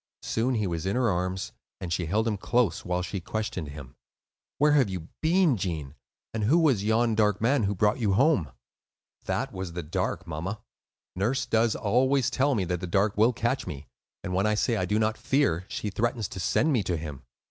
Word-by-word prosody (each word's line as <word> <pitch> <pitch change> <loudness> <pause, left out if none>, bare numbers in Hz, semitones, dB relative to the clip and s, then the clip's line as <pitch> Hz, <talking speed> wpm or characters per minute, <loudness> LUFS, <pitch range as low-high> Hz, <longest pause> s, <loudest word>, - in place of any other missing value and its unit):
Soon 125 +3 0
he 105 -2 0
was 85 -1 -2
in 100 - 0
her 125 -3 +2
arms; 90 +1 -2 0.3
and 85 -2 -3
she 85 -1 -1
held 110 +6 +1
him 110 - +1
close, 115 +1 +1
while 90 0 -1
she 95 +2 -4
questioned 95 -4 -3
him. 70 -3 -10 0.6
"Where 150 +1 +4
have 140 -7 +4
you 90 -3 -6
been, 165 -4 +3
Gene, 80 -7 -3 0.4
and 110 -2 -1
who 145 +10 +4
was 140 -12 +3
yon 110 +2 +2
dark 105 -2 +2
man 120 0 +2
who 100 +1 -1
brought 105 +5 +2
you 105 -5 +1
home?" 105 - +3 0.7
"That - - -2
was 95 -2 -5
the 90 0 -4
Dark, 90 +3 -2
mamma. 85 +6 -4 0.6
Nurse 120 +8 0
does 115 -1 +2
always 130 +4 +2
tell 135 +2 +2
me 100 - +1
that 90 0 -2
the 90 - -5
Dark 100 +4 +1
will 110 +4 +4
catch 120 +3 -1
me; 70 -1 -6 0.4
and 90 - -4
when 95 +3 +2
I 105 - +2
say 115 +3 +1
that 115 - 0
I - - 0
do 105 +4 0
not 110 0 0
fear, 130 - +1
she 105 - -3
threatens 115 -1 -1
to 95 - -7
send 150 - +2
me 120 - +2
to 90 -3 -1
him. 75 -3 -7
105 Hz, 210 wpm, -27 LUFS, 90-120 Hz, 0.7 s, Where